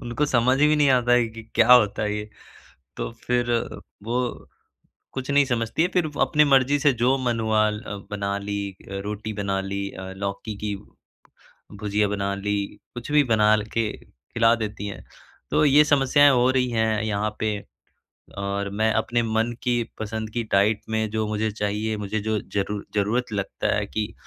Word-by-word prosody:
उनको 120 +5 -1
समझ 130 0 +3
भी 150 +1 +4
नहीं 145 -1 +4
आता 120 -1 +3
है 120 -1 +4
कि 115 0 -10
क्या 115 +2 +6
होता 110 -4 +5
है 105 0 -1
ये? 105 0 -5 0.7
तो - - -3 0.2
फिर 120 -1 +1 0.5
वो 120 +2 -3 0.6
कुछ 130 +1 -5
नहीं 145 0 +5
समझती 120 +2 -1
हैं 180 - +1
फिर 175 -4 +1
अपनी 150 0 +4
मर्ज़ी 140 0 +4
से 140 -1 +4
जो 130 +2 +4
मन 120 -3 -1
हुआ 110 -1 +2
ल 105 -2 -7
बना 100 -1 -2
ली। 100 -1 -4
रोटी 105 +2 -4
बना 100 -2 -2
ली 100 +1 -4
लौकी 100 +2 -5
की 105 -1 -1 1.0
भुजिया 105 0 0
बना 100 -1 -2
ली 105 +1 -2 0.4
कुछ 120 +4 -7
भी 150 -1 +5
बना 105 0 +5 0.2
के 115 -2 0
खिला 115 - 0
देती 105 -2 -5
हैं। 100 - -8 0.5
तो - - +3
ये 145 +2 +6
समस्याएँ 145 0 +5
हो 125 0 +3
रही 130 -1 +1
हैं 110 -1 +1
यहाँ 105 0 -1
पे, 105 -1 -1 0.8
और 100 0 -2
मैं 110 +2 +1
अपने 120 +2 0
मन 115 +1 0
की 120 -2 +1 0.2
पसंद 110 0 -4
की 120 +1 -2
डाइट 105 +2 +3
में 110 0 0
जो 110 0 -1
मुझे 110 +1 -1
चाहिए 105 +1 -2
मुझे 105 +1 -3
जो 110 +1 -1 0.2
ज़रूर 100 0 -2
ज़रूरत 110 +4 0
लगता 100 -2 -1
है 105 -1 -1
कि 105 0 -3
110 Hz, 175 wpm, -24 LUFS, 105-120 Hz, 1.0 s, क्या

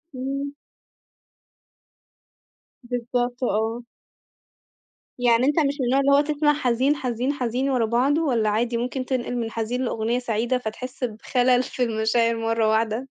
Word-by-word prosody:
إمم. 275 +2 -3 2.3
بالضبط 245 +1 -2
آه. 225 +2 -1 1.4
يعني 245 0 +3
أنت 295 +3 +2
مش 285 -2 +1
من 260 - 0
النوع 260 +3 +2
اللي 280 0 +3
هو 285 +1 +6
تسمع 295 0 +1
حزين، 260 +1 +1
حزين، 255 +1 -2
حزين، 255 0 -1
ورا 250 -4 +2
بعضه، 260 +8 +2
والّا 230 -7 +1
عادي 235 +3 0
ممكن 255 +2 -3
تنقل 250 -2 -2
من 225 -1 -3
حزين 230 +3 -2
لأغنية 230 +1 -1
سعيدة 240 +1 0
فتحس 250 +3 -6
بخلل 245 +2 +1
في 250 0 -3
المشاعر 230 +1 +1
مرة 225 -1 +1
واحدة؟ 220 +1 +1
245 Hz, 135 wpm, -24 LUFS, 230-260 Hz, 2.3 s, هو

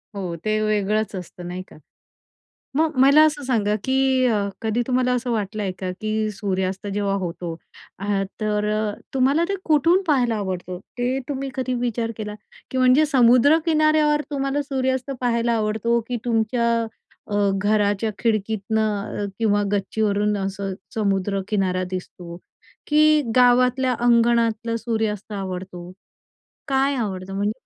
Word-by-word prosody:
हो, 180 -4 -4
ते 215 0 +1
वेगळंच 215 0 0
असतं, 180 -1 -8
नाही 180 +1 -5
का? - - -16 1.0
मग 315 -1 +1
मला 280 +3 +7
असं 295 -1 -2
सांगा, 215 -5 +1
की 265 -1 +2
अ, 205 -4 +1
कधी 225 +2 0
तुम्हाला 250 -1 +1
असं 245 0 -2
वाटलंय 210 -3 -2
का, 185 -1 -3
की 215 0 -1
सूर्यास्त 190 -1 -2
जेव्हा 200 -1 0
होतो, 170 -1 -4 0.4
अ 200 0 -1 0.2
तर 210 -1 0
अ, 215 -1 -1 0.2
तुम्हाला 275 +6 +3
ते 395 - 0
कुठून 330 +5 +3
पाहायला 245 -7 +2
आवडतं? 185 -2 -4 0.2
ते 250 +2 0
तुम्ही 275 -1 -3
कधी 255 -1 -2
विचार 235 -1 -1
केला? 210 -1 -5 0.4
की 260 - -2
म्हणजे 255 +4 +5
समुद्र 260 +2 +5
किनाऱ्यावर 310 -1 +3
तुम्हाला 275 0 -1
सूर्यास्त 260 -1 -1
पाहायला 235 -1 +1
आवडतो, 220 +2 0
की 245 - -1
तुमच्या 235 0 +1 0.6
अ, - - -2 0.2
घराच्या 205 +1 +1
खिडकीतनं 215 -1 -1
अ, - - -1
किंवा 205 -2 +2
गच्चीवरून 205 +1 0
असं 195 0 -3 0.2
समुद्रकिनारा 195 -2 0
दिसतो, 175 -2 -7 0.5
की 305 0 +5 0.2
गावातल्या 250 +1 +4
अंगणातलं 235 -1 +2
सूर्यास्त 220 -3 -2
आवडतो? 185 -2 -6 0.8
काय 270 +1 +2
आवडतं? 195 -4 -4
म्हणजे 205 +2 0
220 Hz, 130 wpm, -22 LUFS, 200-255 Hz, 1.0 s, मला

